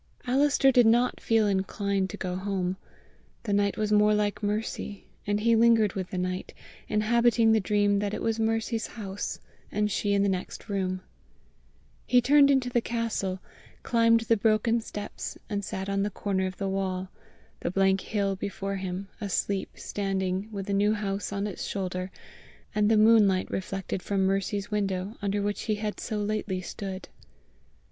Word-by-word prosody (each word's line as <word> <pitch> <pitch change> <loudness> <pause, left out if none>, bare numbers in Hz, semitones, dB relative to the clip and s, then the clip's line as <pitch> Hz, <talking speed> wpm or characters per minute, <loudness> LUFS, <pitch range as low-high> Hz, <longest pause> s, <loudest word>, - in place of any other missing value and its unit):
Alister 270 +1 +4
did 245 -3 +5
not 240 +2 +3
feel 225 -1 +3
inclined 195 0 0
to - - -7
go 180 -1 -3
home. 190 -1 -2 0.7
The 210 -3 -1
night 200 0 +1
was 215 -1 -1
more 210 0 +5
like 205 -1 0
Mercy, 210 -1 -3 0.2
and 205 0 +1
he 230 +2 +3
lingered 225 -3 +4
with 185 -2 -4
the 185 - -4
night, 185 0 -3 0.3
inhabiting 230 +1 +3
the 220 - +4
dream 205 0 +2
that 205 0 -1
it - - -5
was 225 0 0
Mercy's 225 0 0
house, 205 -3 -5 0.3
and 210 0 0
she 205 0 0
in 200 0 +3
the - - +2
next 185 +2 -4
room. 185 -2 -1 1.1
He 250 - +5
turned 280 +3 +5
into 265 -3 +3
the 240 - +2
castle, 225 -6 -2 0.4
climbed 230 -1 +4
the 225 0 +2
broken 225 +2 +2
steps, 210 -2 -6
and 205 -1 -1
sat 190 0 -4
on 195 0 0
the 205 - 0
corner 190 -1 -1
of 185 - -7
the 195 - -2
wall, 190 -1 -2 0.5
the - - -2
blank 195 +1 +2
hill 200 -2 -1
before 195 0 -4
him, 190 +1 -4
asleep 200 -1 -1
standing, 195 0 -2
with 200 -2 -4
the 200 - -2
New 205 +2 +3
House 200 -2 -3
on 200 0 -2
its 205 -3 -5
shoulder, 185 -1 -3 0.6
and 210 0 +2
the 220 - +4
moonlight 210 -4 +5
reflected 190 0 -3
from 195 0 0
Mercy's 195 +2 -1
window 195 0 -1
under 200 0 0
which 205 0 -2
he 215 - +3
had 210 0 -4
so 215 - -3
lately 210 -2 -2
stood. 190 +1 -6
205 Hz, 170 wpm, -27 LUFS, 195-220 Hz, 1.1 s, did